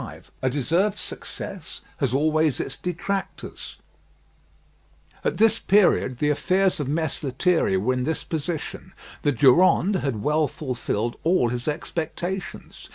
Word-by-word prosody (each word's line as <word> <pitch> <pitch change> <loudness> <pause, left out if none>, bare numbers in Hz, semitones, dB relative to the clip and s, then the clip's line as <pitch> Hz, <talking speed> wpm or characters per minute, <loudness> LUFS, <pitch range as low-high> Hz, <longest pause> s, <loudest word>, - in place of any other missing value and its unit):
V - - -8 0.2
A 130 - +2
DESERVED 170 - +1
SUCCESS - - -7 0.2
HAS 135 -4 0
ALWAYS 155 +2 +2
ITS 135 - -4
DETRACTORS 180 +3 -4 1.5
At - - 0
this 225 0 +4
period 185 -10 +3
the 150 +3 +2
affairs 185 +5 +1
of 145 - -2
Mess 155 +1 -1
Lethierry 140 - +1
were 110 +7 +1
in 125 0 -1
this 160 +5 -2
position: 165 +3 -4 0.3
The 145 - +2
Durande 175 - +4
had 120 -9 -2
well 150 0 +2
fulfilled 120 -5 -3
all 165 -8 +3
his 120 +3 -3
expectations. 170 +4 -4
155 Hz, 130 wpm, -24 LUFS, 130-180 Hz, 1.5 s, this